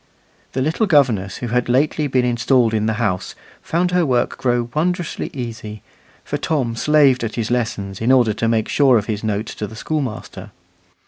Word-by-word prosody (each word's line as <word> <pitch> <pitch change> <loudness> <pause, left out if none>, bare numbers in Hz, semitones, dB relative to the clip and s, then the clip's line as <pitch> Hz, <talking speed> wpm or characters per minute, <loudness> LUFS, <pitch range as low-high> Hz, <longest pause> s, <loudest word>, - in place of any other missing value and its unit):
The 130 - 0
little 165 - 0
governess 120 - +2
who - - -4
had 125 +1 0
lately 145 +4 +1
been 130 -2 +1
installed 120 -1 +2
in 110 -1 +1
the 110 - +1
house 105 -5 -2 0.3
found 180 +2 0
her 180 -1 +3
work 125 -5 +1
grow 120 -2 0
wondrously 175 +2 -1
easy, 115 -5 -7 0.4
for - - -4
Tom 130 -8 -1
slaved 140 -1 +3
at 110 - -3
his 115 -1 -2
lessons, 100 -5 -2
in 115 +3 +2
order 120 -5 +4
to 115 +2 -1
make 115 -1 +1
sure 135 -4 +4
of 105 - -1
his 105 -1 -3
note 105 0 -1
to 105 - -5
the 110 - -11
schoolmaster. 130 -3 -4
120 Hz, 185 wpm, -20 LUFS, 110-140 Hz, 0.4 s, order